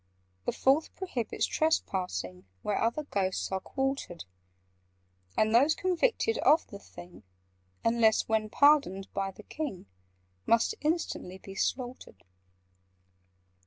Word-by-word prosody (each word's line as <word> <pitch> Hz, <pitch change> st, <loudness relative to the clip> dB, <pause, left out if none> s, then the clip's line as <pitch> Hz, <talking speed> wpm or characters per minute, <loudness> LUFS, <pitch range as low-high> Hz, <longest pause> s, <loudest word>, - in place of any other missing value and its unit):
"The -, -, +1 dB
Fourth 275 Hz, +4 st, +2 dB
prohibits 260 Hz, -, -2 dB
trespassing 140 Hz, -, -1 dB, 0.2 s
Where 205 Hz, -, -1 dB
other 235 Hz, +7 st, 0 dB
Ghosts 195 Hz, -9 st, -2 dB
are 190 Hz, -, 0 dB
quartered: 270 Hz, -, -3 dB, 1.1 s
And 215 Hz, 0 st, +3 dB
those 280 Hz, +7 st, +5 dB
convicted 450 Hz, +5 st, +1 dB
of 315 Hz, -, +4 dB
the 200 Hz, -, -10 dB
thing 175 Hz, -2 st, -13 dB, 0.6 s
(Unless 230 Hz, -1 st, +3 dB
when 220 Hz, -1 st, 0 dB
pardoned 285 Hz, -9 st, +3 dB
by 195 Hz, 0 st, -1 dB
the 195 Hz, +3 st, -12 dB
King) 285 Hz, -, -5 dB, 0.6 s
Must 230 Hz, -, +3 dB
instantly 300 Hz, -, -2 dB
be 195 Hz, +1 st, -11 dB
slaughtered. 245 Hz, -, -3 dB
230 Hz, 110 wpm, -30 LUFS, 195-300 Hz, 1.1 s, those